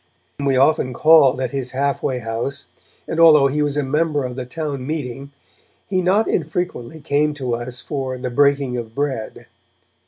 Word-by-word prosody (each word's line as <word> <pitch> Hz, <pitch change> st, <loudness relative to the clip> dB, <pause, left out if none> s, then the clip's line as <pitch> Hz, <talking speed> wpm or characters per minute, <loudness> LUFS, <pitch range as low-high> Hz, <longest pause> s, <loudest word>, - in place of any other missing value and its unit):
We 135 Hz, -2 st, +2 dB
often 130 Hz, -1 st, +2 dB
called 140 Hz, -2 st, +5 dB
at 130 Hz, -2 st, -2 dB
his 135 Hz, -2 st, -3 dB
half 140 Hz, +1 st, -1 dB
way 130 Hz, -, -1 dB
house, 120 Hz, +4 st, -4 dB, 0.4 s
and, 160 Hz, -, -3 dB
although 155 Hz, -4 st, +7 dB
he 140 Hz, +2 st, +1 dB
was 145 Hz, -1 st, 0 dB
a 145 Hz, -, +1 dB
member 150 Hz, +1 st, 0 dB
of 125 Hz, -1 st, -5 dB
the 125 Hz, -1 st, -6 dB
town 140 Hz, -2 st, -5 dB
meeting, 140 Hz, -3 st, -5 dB, 0.6 s
he 185 Hz, -1 st, 0 dB
not 195 Hz, +5 st, +2 dB
unfrequently 160 Hz, -4 st, -3 dB
came 145 Hz, 0 st, +1 dB
up 150 Hz, -, -6 dB
to 130 Hz, -4 st, -3 dB
us 120 Hz, +1 st, -4 dB
for 135 Hz, -3 st, -4 dB
'the 125 Hz, 0 st, -4 dB
breaking 140 Hz, -1 st, +2 dB
of 115 Hz, -1 st, -7 dB
bread'. 135 Hz, -6 st, -3 dB
140 Hz, 180 wpm, -20 LUFS, 125-150 Hz, 0.6 s, although